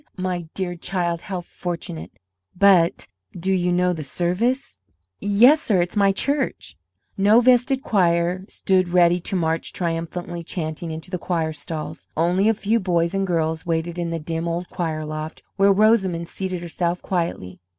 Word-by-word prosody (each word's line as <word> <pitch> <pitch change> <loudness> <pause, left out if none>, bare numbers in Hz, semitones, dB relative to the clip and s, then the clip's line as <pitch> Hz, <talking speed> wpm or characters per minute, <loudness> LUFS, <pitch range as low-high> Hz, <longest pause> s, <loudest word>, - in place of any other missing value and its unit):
My 180 -3 -3
dear 185 -2 -2
child, 175 -1 -2
how 185 -3 -4
fortunate! 165 - -6 0.5
But 180 -3 +4 0.3
do 190 +3 0
you 180 -1 +1
know 180 0 +2
the 160 -3 -5
service?" 180 - -1 0.4
"Yes, 240 +10 +5
sir, 205 -6 +2
it's 175 +3 -1
my 200 -1 +4
church." 275 +8 -2 0.4
No 210 +4 +6
vested 255 +2 +3
choir 175 -2 +1
stood 185 -2 +1
ready 175 0 +4
to 195 - -4
march 165 -2 -1
triumphantly 170 0 -3
chanting 165 -1 -4
into 160 +2 -7
the 180 - -2
choir 165 -3 -1
stalls. 155 +1 -6
Only 180 +6 +3
a 225 - +2
few 215 +3 +1
boys 170 -3 0
and 195 0 0
girls 160 -1 -1
waited 165 +1 -1
in 170 -1 -2
the 165 - -2
dim 165 +1 -3
old 170 +1 -3
choir 160 -4 -3
loft, 155 +1 -6
where 200 0 +5
Rosamond 195 -5 +3
seated 185 -2 -4
herself 175 +1 -2
quietly. 165 - -3
175 Hz, 160 wpm, -22 LUFS, 165-195 Hz, 0.5 s, No